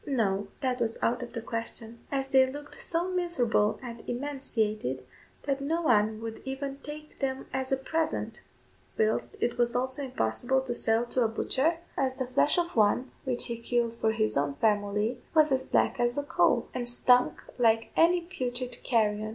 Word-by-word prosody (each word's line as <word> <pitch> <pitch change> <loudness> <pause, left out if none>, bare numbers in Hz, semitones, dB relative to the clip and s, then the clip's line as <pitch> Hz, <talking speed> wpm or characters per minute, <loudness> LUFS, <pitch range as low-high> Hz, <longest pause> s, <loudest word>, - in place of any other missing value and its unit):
No; 205 -7 0
that 255 -2 -1
was 230 -1 0
out 240 +2 +1
of 245 - -7
the 230 -2 -5
question, 230 0 -5
as 270 -1 -1
they 265 -1 +6
looked 290 +1 -8
so 345 +2 -1
miserable 255 -13 +1
and 235 -2 -7
emaciated, 220 - -2 0.4
that 275 -1 -1
no 325 +5 -1
one 215 -5 +3
would 225 -1 -6
even 275 +1 -4
take 300 0 -9
them 265 -1 -2
as 265 0 -2
a 270 - +3
present, 320 +4 -2 0.6
whilst 220 0 +1
it 240 0 -1
was 240 0 +2
also 260 +3 0
impossible 250 - 0
to 255 -2 -3
sell 225 0 +1
to 250 +1 -1
a - - +3
butcher, 270 +8 +1 0.2
as 260 -1 0
the 260 - -2
flesh 255 +5 +2
of 345 0 0
one 225 +4 +3
which 250 -2 0
he 235 -1 -4
killed 235 -1 0
for 225 -1 +1
his 215 -1 0
own 140 0 0
family 210 - +1 0.2
was 310 -2 +5
as 265 0 +1
black - - +2
as 240 +1 +1
a 285 - 0
coal, 285 - +2
and 245 -1 -1
stunk 250 +1 +3 0.2
like 225 -1 +3
any 345 +2 +5
putrid 250 -8 -4
carrion. 215 -3 +1
245 Hz, 180 wpm, -29 LUFS, 225-270 Hz, 0.6 s, they